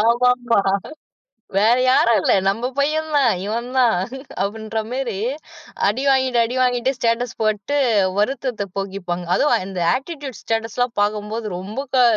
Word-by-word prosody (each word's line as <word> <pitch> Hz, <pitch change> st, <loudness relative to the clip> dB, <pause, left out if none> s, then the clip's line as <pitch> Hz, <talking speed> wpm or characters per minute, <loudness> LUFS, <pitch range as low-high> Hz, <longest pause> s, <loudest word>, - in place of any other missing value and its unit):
ஆமாமா. 245 Hz, +1 st, +3 dB, 1.0 s
வேற 220 Hz, +4 st, +5 dB
யாரும் 235 Hz, -3 st, +4 dB
இல்ல. -, -, +3 dB, 0.2 s
நம்ம 225 Hz, +6 st, 0 dB
பையன் 310 Hz, +3 st, +1 dB
தான், 265 Hz, -5 st, +4 dB
இவன் 230 Hz, +4 st, -3 dB
தான் 245 Hz, -5 st, +4 dB, 0.5 s
அப்டின்ற 220 Hz, +2 st, -3 dB
மாரி 250 Hz, -4 st, -2 dB, 0.7 s
அடி 225 Hz, +6 st, -1 dB
வாங்கிட்டு 260 Hz, -2 st, +2 dB
அடி 240 Hz, +3 st, -4 dB
வாங்கிட்டு 250 Hz, 0 st, +1 dB
ஸ்டேட்டஸ் 230 Hz, 0 st, 0 dB
போட்டு 215 Hz, +6 st, 0 dB, 0.4 s
வருத்தத்தப் 215 Hz, -3 st, -1 dB
போக்கிப்பாங்க. 190 Hz, -3 st, -4 dB
அது -, -, +2 dB, 0.2 s
இந்த 190 Hz, -2 st, -5 dB, 0.2 s
ஆட்டிட்யூட் 275 Hz, -3 st, -7 dB
ஸ்டேட்டஸ்லாம் 225 Hz, +2 st, -1 dB
பார்க்கும்போது 210 Hz, +2 st, -1 dB
ரொம்பக்கா 250 Hz, +7 st, -1 dB
235 Hz, 125 wpm, -21 LUFS, 210-255 Hz, 1.0 s, வேற